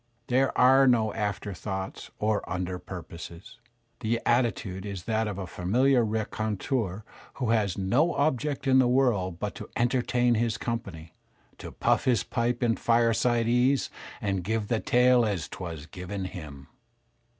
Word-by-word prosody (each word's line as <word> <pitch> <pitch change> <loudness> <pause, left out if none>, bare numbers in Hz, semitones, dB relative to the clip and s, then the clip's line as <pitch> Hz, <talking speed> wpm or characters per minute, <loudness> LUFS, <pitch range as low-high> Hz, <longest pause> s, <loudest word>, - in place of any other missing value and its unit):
There 130 +2 +2
are 135 +2 +6
no 110 -4 +3
after 105 -1 -3
thoughts 95 0 -5
or 105 0 +1
under 90 0 -3
purposes. 90 +5 -9 0.4
The 115 0 0
attitude 115 -6 0
is 100 -3 -6
that 110 -1 0
of 100 -3 -4
a 95 - -4
familiar 120 +9 +2
raconteur 110 -1 -2 0.3
who 125 -4 -1
has 105 -5 +1
no 125 - +2
object 145 -1 0
in 130 -1 +5
the 130 - +4
world 120 -9 +1
but 105 -1 -3
to - - -9
entertain 125 0 +2
his 115 -1 0
company, 100 -9 -5 0.5
to - - -8
puff - - +1
his 125 -4 +2
pipe 120 +1 -1
in 115 -1 +2
fireside 115 0 +2
ease 125 +3 +2 0.3
and 95 -3 -1
give 110 +2 -2
the 115 - +1
tale 125 +1 +4
as 100 -6 -1
'twas 85 -5 -7
given 95 +2 -6
him. 75 -7 -8
110 Hz, 150 wpm, -27 LUFS, 95-125 Hz, 0.5 s, are